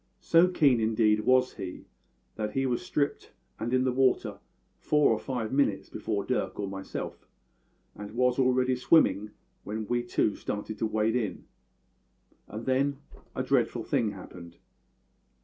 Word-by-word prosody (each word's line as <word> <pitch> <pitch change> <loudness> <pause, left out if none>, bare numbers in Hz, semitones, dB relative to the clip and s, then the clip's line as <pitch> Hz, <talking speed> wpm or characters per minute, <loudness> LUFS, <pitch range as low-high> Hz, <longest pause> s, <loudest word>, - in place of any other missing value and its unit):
So 170 +2 +5
keen, 145 -9 +3
indeed, 110 -1 +2
was 130 0 +4
he, 90 -1 -7 0.5
that 105 -1 -3
he 135 0 0
was 125 -2 0
stripped 150 -6 -2 0.3
and 115 +2 -3
in 130 0 +3
the 130 - +1
water 130 0 +1 0.4
four 150 -4 +3
or 110 - -2
five 125 -3 -4
minutes 105 -9 +1
before 105 -2 -3
Dirk 125 - -2
or 100 - -2
myself, 95 0 -6 0.7
and 105 0 -8
was 125 +1 +2
already 130 0 +3
swimming 125 -6 +3 0.3
when 110 +1 -4
we 120 +2 0
two 120 -3 0
started 105 +1 -5
to 110 - +1
wade 110 +1 0
in. 105 -7 -2 1.0
And 110 +2 -7
then 135 +2 +1 0.4
a - - -1
dreadful - - +1
thing 110 -3 0
happened. 85 -2 -11
120 Hz, 150 wpm, -28 LUFS, 105-130 Hz, 1.0 s, So